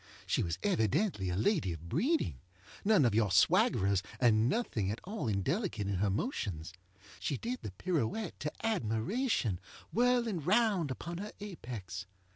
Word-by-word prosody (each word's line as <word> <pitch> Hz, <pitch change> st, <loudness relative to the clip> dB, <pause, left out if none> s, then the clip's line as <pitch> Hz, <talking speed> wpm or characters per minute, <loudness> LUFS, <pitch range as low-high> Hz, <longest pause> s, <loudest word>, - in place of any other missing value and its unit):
She -, -, +1 dB
was 85 Hz, -1 st, -1 dB
evidently 110 Hz, -, +1 dB
a 90 Hz, -, -1 dB
lady 110 Hz, -, +1 dB
of 85 Hz, +1 st, -9 dB
breeding. 170 Hz, -, +1 dB, 0.4 s
None 200 Hz, -9 st, +5 dB
of 115 Hz, -, +3 dB
your 110 Hz, -1 st, +3 dB
swaggerers, 100 Hz, -, +4 dB, 0.2 s
and 115 Hz, -1 st, +4 dB
nothing 120 Hz, -, 0 dB
at 105 Hz, -, -3 dB
all 205 Hz, -, -4 dB
indelicate 110 Hz, -, -1 dB
in 100 Hz, -1 st, -1 dB
her 100 Hz, +2 st, +2 dB
motions. 95 Hz, -, -2 dB, 0.5 s
She 140 Hz, -, -1 dB
did 245 Hz, -, -3 dB
the -, -, -5 dB
pirouette 175 Hz, -, -2 dB
to 150 Hz, -, -2 dB
admirationŌĆöwhirling 215 Hz, -, 0 dB
round 200 Hz, -3 st, +3 dB
upon 170 Hz, +6 st, -5 dB
her 210 Hz, +2 st, -5 dB
apex. 115 Hz, -, -6 dB
125 Hz, 140 wpm, -33 LUFS, -, 0.5 s, None